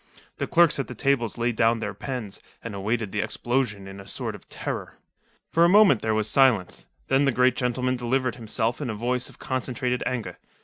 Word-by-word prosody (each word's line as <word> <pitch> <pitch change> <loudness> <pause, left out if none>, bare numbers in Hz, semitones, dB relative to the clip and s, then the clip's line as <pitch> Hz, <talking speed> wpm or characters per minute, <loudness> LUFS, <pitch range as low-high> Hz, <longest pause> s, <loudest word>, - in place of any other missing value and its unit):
The - - -2
clerks 170 -4 +4
at 135 - -2
the 125 - -8
tables 125 -3 0
laid 120 0 0
down 115 +1 +3
their 105 -2 -3
pens, 110 -1 -6 0.2
and 115 - -6
awaited 105 +1 -2
the - - -2
explosion 120 -6 -2
in 95 0 -9
a 100 - -11
sort - - -4
of - - -13
terror. - - -5 0.5
For 165 - +2
a - - +8
long 175 - +3
moment 200 - +6
there 110 -1 0
was 110 -1 0
silence. 110 - +2 0.2
Then 135 +1 +3
the 135 - +3
great 125 +1 +3
gentleman 125 +1 0
delivered 125 +1 0
himself 115 +1 -2
in 135 - -3
a 110 - -3
voice 125 +3 -1
of - - -17
concentrated 125 -1 -2
anger. 125 -3 -4
120 Hz, 210 wpm, -25 LUFS, 110-130 Hz, 0.5 s, a